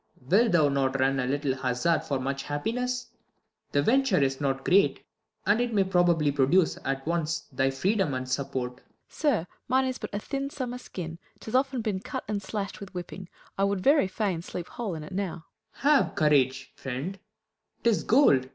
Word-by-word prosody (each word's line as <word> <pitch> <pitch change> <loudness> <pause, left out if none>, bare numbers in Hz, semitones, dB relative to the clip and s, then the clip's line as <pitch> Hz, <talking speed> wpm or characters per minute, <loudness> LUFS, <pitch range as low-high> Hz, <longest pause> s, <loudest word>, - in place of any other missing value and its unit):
Wilt 200 - +3
thou 155 -4 +5
not 135 -1 0
run 135 +1 +2
a 125 - 0
little 140 0 0
hazard 130 +5 +1
for 140 -4 -2
Much 135 +1 -2
happiness? 245 - -2 0.6
The 145 - +2
venture 260 - +3
is 135 0 +1
not 135 -1 -1
great; 180 -7 +3 0.4
And 210 +4 +3
it 240 -2 -1
may 200 - +5
probably 175 -5 +3
produce 145 +6 +3
at 135 0 -2
once 165 -1 -1
Thy 135 0 +1
freedom 185 +2 0
and 130 0 -3
support. 130 -2 -2
Fool. - - -33 0.2
Sir, 245 - 0 0.2
mine 260 +1 +3
is 260 -1 -3
but - - -5
A 205 - -2
thin 275 +6 -3
summer 250 -3 -4
skin; 170 -8 -7 0.2
't - - -14
has 255 +5 +2
been 255 -3 -2
often 210 -4 -1
cut - - -5
And 205 -1 -2
slasht 200 0 -4
with 200 -2 -10
whipping. 180 0 -7 0.3
I - - +3
would 200 -1 +1
very 280 -2 +4
fain 190 -3 -1
Sleep 175 0 -6
whole 215 -7 -4
in 155 - -6
it 155 - -9
now. 180 -4 -3 0.3
Claud. 290 +2 +4
Have - - -10
courage, 135 -3 +2
friend, 140 +9 -5 0.6
'tis 230 -3 +3
gold 175 - +4
175 Hz, 190 wpm, -27 LUFS, 135-210 Hz, 0.6 s, thou